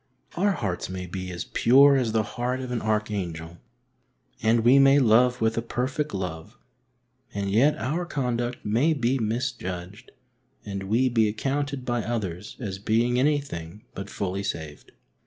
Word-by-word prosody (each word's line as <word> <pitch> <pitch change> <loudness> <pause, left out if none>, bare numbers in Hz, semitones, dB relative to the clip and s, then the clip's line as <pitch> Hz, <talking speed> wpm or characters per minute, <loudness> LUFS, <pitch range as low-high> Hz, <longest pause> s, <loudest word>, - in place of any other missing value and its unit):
Our 200 +3 +2
hearts 95 - -3
may 95 0 -5
be 90 +1 -6
as 90 -1 -4
pure 140 +4 +5
as 125 -4 +1
the 110 0 +1
heart 120 +4 -3
of 130 -1 -5
an 120 - -2
archangel, 95 -6 -3 0.8
and 115 +1 +3
we 125 +4 +6
may 135 +1 +6
love 125 -1 +4
with 110 +1 +1
a - - -2
perfect 130 +5 -2
love, 90 -5 -5 0.8
and 100 -1 -2
yet 130 +9 +4
our 155 +10 -2
conduct 125 -4 -2
may 120 +10 +2
be 130 -2 0
misjudged 105 -5 -4 0.6
and 100 -2 -4
we 120 +5 +3
be 115 -3 +3
accounted 135 +5 -2
by 120 -1 0
others 105 -3 -4
as 100 -6 -5
being 115 +4 +1
anything 125 - -1
but 95 +1 -7
fully 100 -1 -3
saved. 80 -6 -6
115 Hz, 155 wpm, -25 LUFS, 100-130 Hz, 0.8 s, we